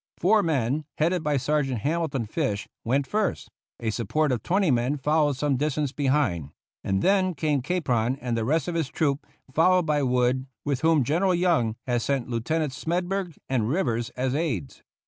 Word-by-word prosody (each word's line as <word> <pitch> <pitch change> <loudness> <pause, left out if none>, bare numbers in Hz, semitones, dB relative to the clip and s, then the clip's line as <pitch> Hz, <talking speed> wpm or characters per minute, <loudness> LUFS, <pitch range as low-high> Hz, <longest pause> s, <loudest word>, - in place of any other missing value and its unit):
Four 210 +4 +4
men, 145 - 0
headed 170 +3 +1
by 150 -2 +1
Sergeant 135 -3 0
Hamilton 150 -3 -1
Fish, 105 -1 -2 0.2
went 135 +4 +1
first; 210 +6 -1 0.3
a 115 -2 -1
support 130 +7 0
of 125 - -1
twenty 190 -2 +2
men 125 +4 +1
followed 150 +1 +2
some 140 -2 +1
distance 150 0 -1
behind; 130 - 0 0.3
and 95 0 0
then 190 -2 +3
came 145 -1 0
Capron 130 -7 0
and 125 -3 -2
the 115 - 0
rest 150 +5 +1
of 175 - -2
his 165 -4 0
troop, 145 -3 -1 0.3
followed 180 +3 +4
by 150 -2 +1
Wood, 125 0 +1 0.2
with 140 -3 -1
whom 160 -3 +4
General 175 +8 +2
Young 165 -11 +2
had 120 -2 0
sent 135 -1 -1
Lieutenants 135 +4 -1
Smedburg 180 0 -1
and 120 -4 0
Rivers 120 -8 0
as 130 0 0
aides. 135 - -2
145 Hz, 170 wpm, -26 LUFS, 125-165 Hz, 0.3 s, Four